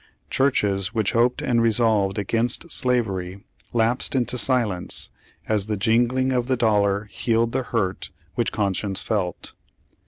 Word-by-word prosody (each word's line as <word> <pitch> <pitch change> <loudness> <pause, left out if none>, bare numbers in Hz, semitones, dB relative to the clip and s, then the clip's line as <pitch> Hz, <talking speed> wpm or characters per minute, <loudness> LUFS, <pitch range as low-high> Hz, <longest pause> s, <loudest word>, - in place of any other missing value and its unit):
Churches 105 -7 +1
which 110 -3 +1
hoped 120 +1 +1
and 120 -2 +2
resolved 110 -3 +2
against 115 - 0
slavery 100 -7 -1 0.3
lapsed 120 +3 +2
into 125 -1 +1
silence, 120 -8 +1 0.4
as 105 -2 0
the 105 -1 -2
jingling 120 +5 +2
of 125 -1 0
the 130 -1 +1
dollar 105 -3 +2
healed 115 +2 0
the - - 0
hurt 105 -7 -2 0.2
which - - -1
conscience 100 -1 -1
felt. 95 -6 -3
115 Hz, 130 wpm, -23 LUFS, 100-120 Hz, 0.4 s, and